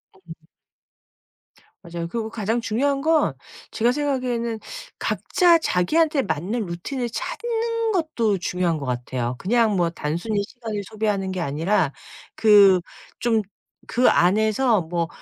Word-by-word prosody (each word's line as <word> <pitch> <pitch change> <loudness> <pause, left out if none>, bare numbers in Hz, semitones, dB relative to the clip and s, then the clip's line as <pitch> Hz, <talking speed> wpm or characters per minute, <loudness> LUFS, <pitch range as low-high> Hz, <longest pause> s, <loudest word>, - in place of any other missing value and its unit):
음. 165 -4 -14 1.4
맞아요. 170 -1 -5
그리고 220 +4 -4
가장 225 +1 -1
중요한 275 +6 0
건 315 0 +2 0.4
제가 235 +1 +2
생각하기에는 250 -5 -1 0.4
각자 350 -2 +3
자기한테 300 - +2
맞는 200 +6 -2
루틴을 235 +9 -4
찾는 460 - -2
것도 315 - 0
중요한 175 -1 -1
것 140 - -6
같아요. 125 0 -3
그냥 225 +1 +2
뭐 175 -2 +2
단순히 170 +7 -2
시간을 220 -1 -6
소비하는 210 -3 -1
게 185 - -4
아니라 165 +2 0 0.4
그 200 -4 +6 0.4
좀 230 -2 +2 0.5
그 250 +2 +4
안에서 215 +4 +3
뭐 170 0 -2
215 Hz, 265 characters per minute, -23 LUFS, 175-250 Hz, 1.4 s, 그